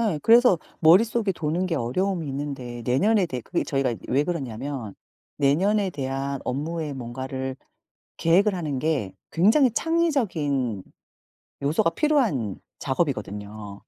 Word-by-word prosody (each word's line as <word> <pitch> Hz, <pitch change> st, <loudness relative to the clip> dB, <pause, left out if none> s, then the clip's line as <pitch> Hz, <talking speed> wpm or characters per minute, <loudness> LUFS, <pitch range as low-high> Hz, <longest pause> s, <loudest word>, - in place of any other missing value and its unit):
예 205 Hz, -10 st, +1 dB
그래서 230 Hz, -5 st, +6 dB, 0.2 s
머릿속에 205 Hz, +5 st, +4 dB
도는 170 Hz, +3 st, -1 dB
게 170 Hz, -, -1 dB
어려움이 170 Hz, +7 st, -1 dB
있는데 135 Hz, -4 st, -5 dB
내년에 190 Hz, -, +3 dB
대해 130 Hz, -5 st, -4 dB
그게 -, -, -2 dB
저희가 135 Hz, -3 st, 0 dB
이 -, -, -5 dB
왜 140 Hz, +4 st, +2 dB
그러냐면 135 Hz, -, -4 dB, 0.4 s
내년에 190 Hz, +8 st, +2 dB
대한 135 Hz, -1 st, -3 dB
업무에 150 Hz, +3 st, -3 dB
뭔가를 130 Hz, +1 st, -5 dB, 0.6 s
계획을 190 Hz, +5 st, +3 dB
하는 150 Hz, -7 st, -3 dB
게 135 Hz, -11 st, -1 dB, 0.2 s
굉장히 225 Hz, -, +4 dB
창의적인 180 Hz, -, 0 dB, 0.8 s
요소가 160 Hz, +3 st, +2 dB
필요한 210 Hz, -, +1 dB, 0.2 s
작업이거든요. 105 Hz, -, -3 dB
145 Hz, 305 characters per minute, -25 LUFS, 130-190 Hz, 0.8 s, 그래서